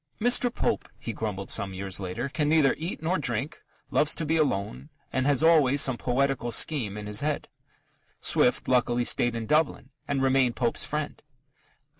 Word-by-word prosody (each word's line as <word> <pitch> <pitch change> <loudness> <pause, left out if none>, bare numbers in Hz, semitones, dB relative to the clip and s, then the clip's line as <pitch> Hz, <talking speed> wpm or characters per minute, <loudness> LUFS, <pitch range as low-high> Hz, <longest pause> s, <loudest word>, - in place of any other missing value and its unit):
"Mr. 245 +1 +3
Pope," 235 - -2
he 115 - -6
grumbled 100 -3 -4
some 100 -3 -4
years 95 0 -4
later, 95 +6 -4
"can 150 +1 -1
neither 155 -3 +4
eat 165 0 -5
nor 180 +4 0
drink, 130 +3 -3 0.3
loves 155 - +2
to 165 - -2
be 160 +2 +1
alone, 135 -3 -1 0.2
and 130 +1 0
has 145 0 +2
always 150 -4 +5
some 130 -2 +3
poetical 130 0 -1
scheme 115 -8 0
in 105 - -6
his 105 0 +1
head." 150 0 -2 0.7
Swift, 125 - +2
luckily, 120 -1 +2
stayed 120 0 +1
in 115 -1 -4
Dublin 150 +4 0 0.2
and 135 -1 -1
remained 130 -2 +2
Pope's 120 -2 0
friend. 150 0 -4
135 Hz, 170 wpm, -27 LUFS, 115-150 Hz, 0.7 s, always